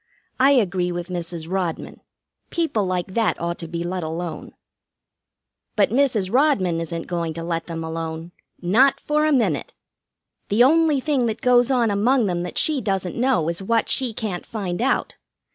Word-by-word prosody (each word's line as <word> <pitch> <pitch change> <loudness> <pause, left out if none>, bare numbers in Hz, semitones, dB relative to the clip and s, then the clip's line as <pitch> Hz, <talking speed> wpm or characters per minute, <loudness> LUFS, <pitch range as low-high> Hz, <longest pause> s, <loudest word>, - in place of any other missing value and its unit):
I 270 +2 +6
agree 185 -7 +1
with 175 +1 -5
Mrs. 170 -2 -5
Rodman. 180 -2 -3 0.5
People 310 - 0
like 185 0 -2
that 225 0 +1
ought 170 +1 -3
to 165 - -6
be 170 +1 -4
let 180 +1 -3
alone." 165 0 -5 1.2
"But 205 -2 +3
Mrs. 235 -7 +1
Rodman 200 - +2
isn't 165 0 -4
going 170 -3 -3
to 165 - -5
let 165 -1 -3
them 165 -1 -5
alone. 160 +1 -5 0.3
Not 235 +10 +3
for 300 +1 +1
a - - +2
minute. 215 - 0 0.7
The 215 +4 +4
only 305 0 +4
thing 270 -4 +1
that 220 -1 -3
goes 245 0 +4
on 240 -5 +2
among 235 +5 +2
them 175 -3 -1
that 180 - -5
she 300 -4 +3
doesn't 190 -4 -2
know 235 -10 +1
is 170 +3 -2
what 225 +3 0
she 260 -3 +1
can't 210 -5 -4
find 190 -5 -4
out. 265 - 0
190 Hz, 170 wpm, -22 LUFS, 170-250 Hz, 1.2 s, I